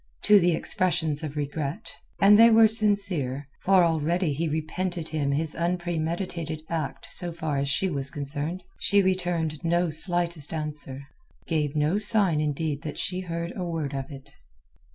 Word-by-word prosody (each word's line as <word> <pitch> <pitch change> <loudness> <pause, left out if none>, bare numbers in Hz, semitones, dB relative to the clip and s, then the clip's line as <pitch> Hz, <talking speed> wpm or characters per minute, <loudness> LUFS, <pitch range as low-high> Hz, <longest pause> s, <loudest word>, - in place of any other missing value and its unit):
To 210 -1 +5
the 175 -2 +1
expressions 160 -4 -1
of 155 -2 -7
regret—and 160 +7 -1
they 230 +1 +8
were 225 0 +6
sincere, 200 - +3
for 190 -1 +3
already 165 0 0
he 165 +4 -3
repented 160 +2 -4
him 145 -3 -2
his 150 +2 -2
unpremeditated 170 -1 -4
act 140 -5 -4
so 175 -1 0
far 160 -4 -4
as 140 0 -2
she 165 +7 0
was 140 -5 -4
concerned—she 150 +8 -2
returned 175 -4 -2
no 170 0 0
slightest 170 -1 +1
answer, 150 -3 -3 0.4
gave 150 -3 -2
no 155 +7 0
sign 200 -7 +8
indeed 150 -1 -3
that 155 -2 -7
she 180 0 -3
heard 170 -1 -5
a 185 - -5
word 160 -5 -4
of 135 +1 -5
it. 135 -2 -12
165 Hz, 150 wpm, -25 LUFS, 150-180 Hz, 0.4 s, they